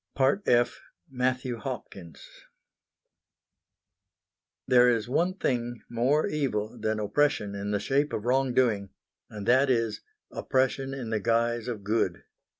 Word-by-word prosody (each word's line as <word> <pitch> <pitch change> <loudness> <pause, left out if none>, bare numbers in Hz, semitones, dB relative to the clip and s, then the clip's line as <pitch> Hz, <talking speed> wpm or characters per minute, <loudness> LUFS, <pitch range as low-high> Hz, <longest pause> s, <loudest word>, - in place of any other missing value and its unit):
F. 120 0 +2 0.3
MATTHEW 125 -1 -1
HOPKINS 100 - -8 2.4
There 125 -1 +5
is 115 -2 0
one 175 +8 +1
thing 120 - -2
more 130 +6 +2
evil 125 -7 -2
than 110 0 -1
oppression 105 -1 +1
in 100 0 -4
the 105 0 0
shape 140 +5 0
of 105 - -4
wrong 130 0 +1
doing, 105 -6 +2 0.4
and 105 -1 -8
that 130 +3 +4
is 115 -3 0 0.3
oppression 135 +1 -1
in 120 -4 -6
the 110 - 0
guise 115 +2 0
of 110 -5 -5
good. 110 +3 0
120 Hz, 125 wpm, -27 LUFS, 110-130 Hz, 2.4 s, There